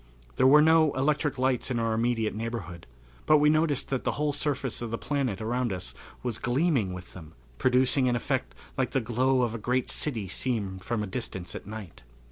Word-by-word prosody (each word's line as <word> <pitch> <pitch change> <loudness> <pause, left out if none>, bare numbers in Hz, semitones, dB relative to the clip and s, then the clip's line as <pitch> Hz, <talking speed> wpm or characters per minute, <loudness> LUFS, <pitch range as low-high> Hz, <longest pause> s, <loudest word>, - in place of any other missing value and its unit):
There - - +5
were 150 +3 +7
no 160 -2 +5
electric 145 +1 +1
lights 130 -1 0
in 125 - -1
our 115 -1 0
immediate 115 -1 0
neighborhood, 105 -7 -5 0.4
but 155 - +7
we 150 0 +5
noticed 155 -3 +1
that 135 -2 -1
the - - 0
whole 150 0 0
surface 140 -4 -1
of 120 - -3
the 115 - -2
planet 135 -9 -2
around 120 +1 -1
us 90 -1 -4 0.3
was 120 -3 -2
gleaming 125 - +1
with 90 0 -9
them, 80 -4 -11 0.3
producing 130 +1 +3
an 120 - +1
effect - - -2 0.2
like - - 0
the - - +3
glow 125 +2 +1
of 115 -2 -1
a 115 - -4
great 125 +3 0
city 115 -10 -2
seen 100 -3 -2
from 105 +3 -2
a - - -2
distance 95 -3 -5
at - - -8
night. 105 - -8
120 Hz, 200 wpm, -28 LUFS, 110-135 Hz, 0.4 s, were